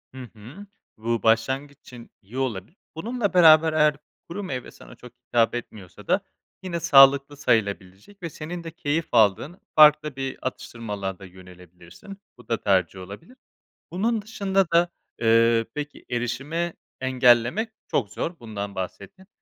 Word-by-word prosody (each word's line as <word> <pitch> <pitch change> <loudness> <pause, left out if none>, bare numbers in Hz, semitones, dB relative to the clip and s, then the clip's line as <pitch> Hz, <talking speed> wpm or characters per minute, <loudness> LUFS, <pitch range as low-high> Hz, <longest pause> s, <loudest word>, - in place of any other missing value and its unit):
Hı 130 - -7
hı. 125 - -12 0.3
Bu, 115 0 -2
başlangıç 130 +6 +1
için 120 -2 -13
iyi 110 +5 -11
olabilir. 130 - -4 0.2
Bununla 220 +4 -2
beraber 160 -2 +6
eğer 150 -1 +3 0.3
kuru 200 +4 -5
meyve 130 -9 -6
sana - - -15
çok 125 - -14 0.2
hitap 115 0 +2
etmiyorsa 105 -6 -9
da - - +2 0.4
yine 175 -2 -3
sağlıklı 140 -1 +5
sayılabilecek 100 - -2
ve 170 - -3
senin 165 +3 -7
de 165 - -7
keyif 160 0 -2
aldığın 115 - +2 0.2
farklı 150 -1 +6
bir 135 -1 -4
atıştırmalığa 105 -7 -5
da 100 - -11
yönelebilirsin. 90 - -14 0.2
Bu 125 - -17
da 115 - -2
tercih 95 -2 +1
olabilir. 100 - -11 0.5
Bunun 220 +5 0
dışında 195 -2 0
da, 170 +1 +4 0.3
ııı, 115 0 +4
peki 150 0 -7
erişime 135 +8 -3 0.3
engellemek 130 - +3 0.2
çok 105 -7 -1
zor, 170 0 -4
bundan 100 -3 -6
bahsettin. 140 - -7
130 Hz, 140 wpm, -24 LUFS, 110-165 Hz, 0.5 s, beraber